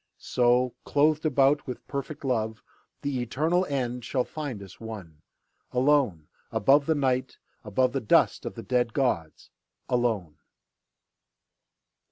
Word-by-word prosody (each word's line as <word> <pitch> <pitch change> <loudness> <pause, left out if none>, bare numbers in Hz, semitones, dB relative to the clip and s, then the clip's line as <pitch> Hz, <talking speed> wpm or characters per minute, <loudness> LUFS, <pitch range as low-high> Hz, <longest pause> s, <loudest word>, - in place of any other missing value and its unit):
So, 125 0 +2
clothed 155 +2 +2
about 140 0 +3
with 125 - -7
perfect 140 +1 -5
love, 110 -4 -1 0.4
The 140 -3 -1
eternal 160 +9 +1
end 125 -5 -2
shall 130 +1 0
find 140 -10 -6
us 95 -1 -13
one, 95 -9 -9 0.5
Alone 125 - +2 0.2
above 140 +6 +4
the 160 - +3
Night, 130 -2 0 0.3
above 125 +4 +1
The 135 - -1
dust 110 - +3
of - - -5
the - - -7
dead 120 -2 0
gods, 85 - -1 0.4
alone. 115 -10 -1
125 Hz, 125 wpm, -27 LUFS, 110-140 Hz, 0.5 s, above